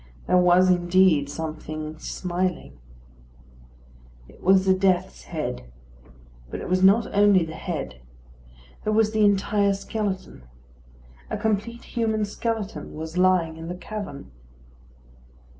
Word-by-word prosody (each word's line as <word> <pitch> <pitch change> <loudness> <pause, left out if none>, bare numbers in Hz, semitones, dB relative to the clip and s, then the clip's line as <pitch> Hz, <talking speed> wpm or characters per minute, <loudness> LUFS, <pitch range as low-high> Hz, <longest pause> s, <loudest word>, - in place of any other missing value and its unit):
There 180 - +2
was 180 +1 +5
indeed 175 -4 +3
something 155 0 -6
smiling. 180 - -3 1.5
It - - -18
was 190 +1 +4
a 190 - +6
death's 185 - 0
head; - - -5 0.8
but - - -5
it - - -6
was 185 0 +1
not 200 +4 +5
only 200 -4 +5
the 160 - -8
head. 155 - -5 0.8
There 215 - 0
was 215 0 +3
the 220 -1 +2
entire 200 0 +2
skeleton. 200 - -4 0.9
A - - -2
complete 220 +2 -2
human 220 -2 -1
skeleton 210 -6 -4
was 160 +2 -7
lying 180 -3 +2
in 165 0 -8
the 175 - -4
cavern. 195 - -7
185 Hz, 120 wpm, -24 LUFS, 160-205 Hz, 1.5 s, a